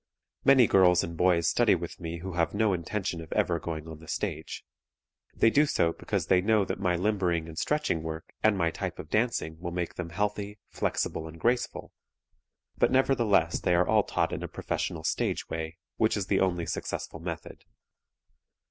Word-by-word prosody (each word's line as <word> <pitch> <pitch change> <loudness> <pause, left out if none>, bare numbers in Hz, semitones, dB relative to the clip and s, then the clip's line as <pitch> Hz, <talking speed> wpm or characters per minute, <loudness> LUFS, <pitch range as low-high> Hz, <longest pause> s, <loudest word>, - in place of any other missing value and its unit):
Many 135 -3 +7
girls 90 -4 +5
and 85 0 -5
boys 85 -1 +3
study - - +4
with - - -6
me 85 0 -5
who 95 0 -5
have 85 +2 0
no 105 -1 +2
intention 90 0 -3
of 80 - -11
ever - - +1
going 80 -1 -5
on 80 -1 -9
the 80 - -14
stage. - - -4 0.7
They 115 - +4
do 150 +4 +4
so 85 -10 +2
because - - -2
they 90 -1 +4
know 105 0 +3
that - - -4
my 90 -2 +1
limbering 90 -4 0
and 80 - -9
stretching 150 - 0
work 80 0 -6
and 110 -2 +3
my 85 -2 +1
type - - -4
of 75 - -9
dancing 105 -8 0
will 85 0 -4
make 85 0 -3
them 90 -2 -5
healthy, 105 +3 -2
flexible 80 - -2
and 80 +1 -11
graceful, 120 +4 -1 0.9
but - - +4
nevertheless 115 -10 +3
they 90 - +2
are 90 +1 +3
all - - +4
taught - - -1
in - - -3
a - - -4
professional - - -3
stage - - -1
way, 80 0 -4 0.2
which 110 -1 +2
is 100 - -2
the 95 +1 +1
only 90 -3 +1
successful 80 0 -4
method. 85 -1 -7
90 Hz, 185 wpm, -28 LUFS, 80-105 Hz, 0.9 s, Many